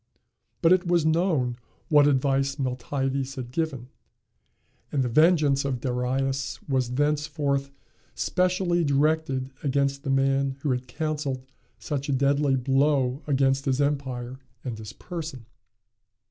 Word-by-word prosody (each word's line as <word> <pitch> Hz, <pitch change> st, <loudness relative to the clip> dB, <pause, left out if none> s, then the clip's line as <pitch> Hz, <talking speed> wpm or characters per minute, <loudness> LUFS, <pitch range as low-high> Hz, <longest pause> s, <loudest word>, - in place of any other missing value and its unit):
But 165 Hz, +2 st, +7 dB
it 185 Hz, -1 st, +1 dB
was 170 Hz, -2 st, +2 dB
known 160 Hz, -7 st, +1 dB, 0.3 s
what 145 Hz, -2 st, +5 dB
advice 135 Hz, 0 st, +2 dB
Miltiades 135 Hz, +1 st, -2 dB
had 125 Hz, -2 st, -6 dB
given, 135 Hz, -5 st, -3 dB, 1.0 s
and 135 Hz, -3 st, +1 dB
the -, -, 0 dB
vengeance 150 Hz, 0 st, +4 dB
of 135 Hz, -3 st, -2 dB
Darius 130 Hz, 0 st, -1 dB
was 130 Hz, -3 st, 0 dB
thenceforth 145 Hz, -1 st, 0 dB, 0.5 s
specially 180 Hz, -1 st, +1 dB
directed 140 Hz, -2 st, +1 dB
against 140 Hz, 0 st, 0 dB
the 140 Hz, -, -5 dB
man 135 Hz, 0 st, +1 dB
who 145 Hz, -, 0 dB
had 125 Hz, 0 st, -2 dB
counselled 145 Hz, -1 st, -3 dB, 0.3 s
such 140 Hz, -2 st, -4 dB
a -, -, +2 dB
deadly 140 Hz, +1 st, +2 dB
blow 135 Hz, +1 st, +1 dB
against 135 Hz, -1 st, +2 dB
his 135 Hz, -1 st, +1 dB
empire 130 Hz, -3 st, -2 dB, 0.2 s
and 125 Hz, -4 st, -4 dB
his 110 Hz, -1 st, -8 dB
person. 160 Hz, -6 st, -7 dB
140 Hz, 125 wpm, -26 LUFS, 130-150 Hz, 1.0 s, But